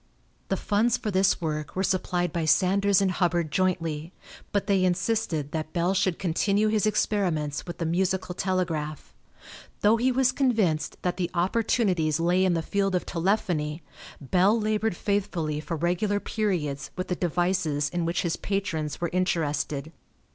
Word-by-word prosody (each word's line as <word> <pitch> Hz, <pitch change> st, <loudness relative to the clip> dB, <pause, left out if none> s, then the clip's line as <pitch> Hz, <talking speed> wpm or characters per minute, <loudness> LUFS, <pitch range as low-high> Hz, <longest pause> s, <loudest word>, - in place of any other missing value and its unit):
The -, -, +1 dB
funds 225 Hz, +4 st, +1 dB
for 215 Hz, -, -3 dB
this 190 Hz, 0 st, +3 dB
work 155 Hz, -3 st, -3 dB
were 190 Hz, -, 0 dB
supplied 180 Hz, -2 st, 0 dB
by 170 Hz, -2 st, -1 dB
Sanders 195 Hz, +4 st, +3 dB
and 190 Hz, -1 st, +2 dB
Hubbard 175 Hz, -4 st, 0 dB
jointly, 165 Hz, -3 st, -1 dB, 0.4 s
but 200 Hz, -, 0 dB
they 195 Hz, -3 st, +2 dB
insisted 180 Hz, -5 st, 0 dB
that 155 Hz, -1 st, -4 dB
Bell 175 Hz, +2 st, +1 dB
should 185 Hz, -2 st, +1 dB
continue 200 Hz, +4 st, +1 dB
his 215 Hz, -1 st, +2 dB
experiments 180 Hz, -9 st, 0 dB
with 175 Hz, -, -6 dB
the 165 Hz, -, -2 dB
musical 185 Hz, +2 st, 0 dB
telegraph. 165 Hz, -, -2 dB, 0.7 s
Though 215 Hz, +2 st, +5 dB
he 250 Hz, +3 st, +2 dB
was 255 Hz, 0 st, +3 dB
convinced 225 Hz, -, +1 dB
that 180 Hz, -, -1 dB
the 175 Hz, -2 st, -1 dB
opportunities 180 Hz, -4 st, +1 dB
lay 175 Hz, +3 st, +2 dB
in 185 Hz, -2 st, +2 dB
the 165 Hz, -, -1 dB
field 195 Hz, +1 st, 0 dB
of 180 Hz, -, -1 dB
telephony, 170 Hz, -4 st, -1 dB, 0.4 s
Bell 185 Hz, -, +3 dB
labored 215 Hz, -2 st, 0 dB
faithfully 175 Hz, -7 st, -1 dB
for 165 Hz, +2 st, -4 dB
regular 180 Hz, +5 st, 0 dB
periods 150 Hz, -12 st, -2 dB
with 185 Hz, -, -4 dB
the 180 Hz, -, -1 dB
devices 175 Hz, -4 st, 0 dB
in 175 Hz, +2 st, -2 dB
which 165 Hz, 0 st, -1 dB
his 170 Hz, -2 st, -1 dB
patrons 185 Hz, -7 st, -2 dB
were 170 Hz, -, -1 dB
interested. 155 Hz, -5 st, -1 dB
180 Hz, 155 wpm, -26 LUFS, 160-200 Hz, 0.7 s, Though